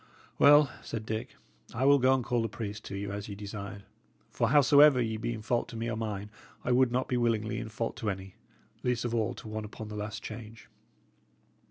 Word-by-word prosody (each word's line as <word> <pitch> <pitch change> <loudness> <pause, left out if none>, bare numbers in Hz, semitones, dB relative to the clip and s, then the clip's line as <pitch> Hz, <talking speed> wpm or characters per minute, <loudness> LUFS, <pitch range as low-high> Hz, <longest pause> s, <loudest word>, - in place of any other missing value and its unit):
"Well," 145 -1 +7
said 110 -1 -5
Dick, 110 0 -4 0.4
"I 130 +3 +1
will 140 0 +6
go 130 +1 +4
call 120 -1 0
the 115 - -1
priest 105 0 -6
to 100 - -6
you 100 0 -4
as 100 +1 -5
ye 100 - -5
desired; 100 -1 -7 0.5
for 115 - +1
howsoever 145 0 +7
ye 110 -2 0
be 115 +2 -2
in 110 -2 -6
fault 120 +2 0
to - - -9
me 115 +1 -2
or - - -2
mine, 105 -2 -4 0.3
I - - 0
would 125 0 +4
not 125 +1 0
be 125 - 0
willingly 115 -2 0
in 115 -1 -6
fault 115 +1 -3
to 110 - -2
any, 95 -1 -5 0.5
least 125 -2 0
of 120 - -2
all 110 -2 0
to - - -10
one 110 0 -4
upon 105 0 -8
the 105 - -6
last 105 +1 -5
change." 115 0 -9
115 Hz, 215 wpm, -30 LUFS, 105-120 Hz, 0.5 s, Well